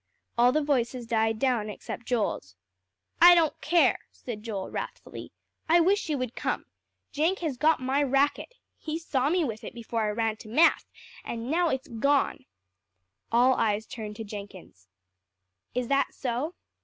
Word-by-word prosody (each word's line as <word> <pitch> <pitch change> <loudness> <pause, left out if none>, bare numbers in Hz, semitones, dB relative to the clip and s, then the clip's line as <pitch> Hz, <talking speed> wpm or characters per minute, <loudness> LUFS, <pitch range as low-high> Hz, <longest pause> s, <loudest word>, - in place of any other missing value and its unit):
All 240 +1 +5
the 305 +3 +1
voices 255 -4 0
died 225 -1 +1
down 235 -3 0
except 225 +3 -7
Joel's. 205 - -1 0.7
"I 350 +1 +10
don't 325 -3 +1
care," 340 +2 +3
said 230 -4 -8
Joel 210 -4 -5
wrathfully. - - -7 0.4
"I 340 +2 +6
wish 385 +5 +3
she 310 -6 -2
would 255 -3 -4
come. - - -2 0.5
Jenk 325 +6 +1
has 310 -6 -2
got 310 +6 +3
my 265 +2 0
racket. 280 - +1 0.2
He 315 0 -4
saw 280 -5 0
me 350 +1 +2
with 220 -4 -5
it - - -8
before 230 -1 -3
I - - 0
ran 220 0 -1
to 215 - -12
math; 315 +9 +4 0.4
and 235 +3 -5
now 340 +1 +2
it's 265 -2 -2
gone." 280 +5 0 0.9
All 245 +3 +5
eyes 215 -2 0
turned 220 -5 -7
to 225 - -6
Jenkins. 200 - -10 0.9
"Is 250 -1 -1
that 275 0 +1
so?" 270 +7 -3
250 Hz, 160 wpm, -27 LUFS, 225-300 Hz, 0.9 s, I